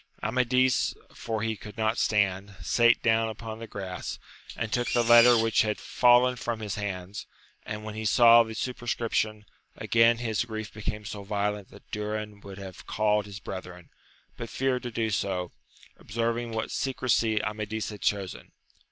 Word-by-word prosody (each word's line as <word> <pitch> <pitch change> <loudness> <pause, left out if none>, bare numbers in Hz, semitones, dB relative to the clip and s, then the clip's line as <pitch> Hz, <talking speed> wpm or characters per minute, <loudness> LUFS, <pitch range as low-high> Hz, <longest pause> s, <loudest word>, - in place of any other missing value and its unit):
Amadis, 125 +3 +2 0.2
for 110 -2 -4
he 110 -1 -1
could 105 0 -11
not 110 +1 0
stand, 100 -1 +1
sate 120 0 +3
down 115 0 +3
upon 110 0 -7
the 115 - -7
grass, 95 -3 -6 0.4
and 110 -2 -3
took 120 0 0
the 120 - +2
letter 120 +1 +7
which 115 0 +3
had 105 -1 0
fallen 125 +1 +4
from 120 -1 -3
his 105 -3 -4
hands, 100 -1 -5 0.4
and, 105 0 -5
when 110 -1 -6
he 110 +1 -5
saw 115 +2 +7
the 110 -1 -3
superscription, 115 -3 -2 0.3
again 115 0 +4
his 115 -2 -1
grief 110 -2 -6
became 105 0 -5
so 105 0 -6
violent 100 0 -2
that - - -17
Durin 105 0 -4
would 100 -1 -10
have 95 -2 -10
called 105 -1 +1
his 100 0 -8
brethren, 90 -3 -8 0.5
but 115 - -6
feared 130 -1 0
to 120 - -5
do 110 -1 -1
so, 95 -3 -1 0.5
observing 115 +2 -2
what 110 -1 -3
secresy 120 -4 +1
Amadis 105 0 -3
had 105 -2 -9
chosen. 100 -3 -2
110 Hz, 160 wpm, -27 LUFS, 105-115 Hz, 0.5 s, letter